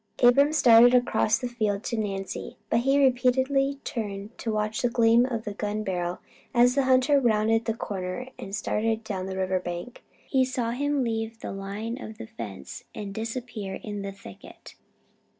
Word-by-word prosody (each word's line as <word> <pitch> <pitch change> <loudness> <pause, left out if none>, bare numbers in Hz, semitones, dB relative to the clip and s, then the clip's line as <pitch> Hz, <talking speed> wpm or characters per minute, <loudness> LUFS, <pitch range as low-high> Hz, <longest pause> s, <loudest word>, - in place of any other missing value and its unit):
Abram 275 +5 +6
started 245 -4 +7
across 230 -2 +3
the 250 - -3
field 215 -4 -1
to 240 - -2
Nancy, 195 -3 -4
but - - +4
he 270 +3 +2
repeatedly 265 +1 +2
turned 205 -1 -5
to 225 - -2
watch 215 0 -1
the 245 - +2
gleam 235 0 +4
of 230 -4 -3
the 210 - -5
gun 210 +1 -3
barrel, 180 -2 -2 0.4
as 245 +1 +5
the 275 0 +2
hunter 260 +2 +4
rounded 225 -2 +2
the 225 - -1
corner 195 +4 -4
and 195 +1 -5
started 220 +1 -1
down 190 -3 -4
the 190 0 -5
river 185 0 0
bank. 175 +6 -6 0.3
He 265 -2 +3
saw 250 -2 -1
him 285 +2 0
leave 225 -1 -3
the - - -5
line 205 +5 -5
of 220 0 -8
the - - -7
fence 100 - -8
and 200 -2 -6
disappear 225 -3 -5
in 205 -1 -5
the 200 0 -4
thicket. 195 - -13
225 Hz, 175 wpm, -26 LUFS, 200-250 Hz, 0.4 s, started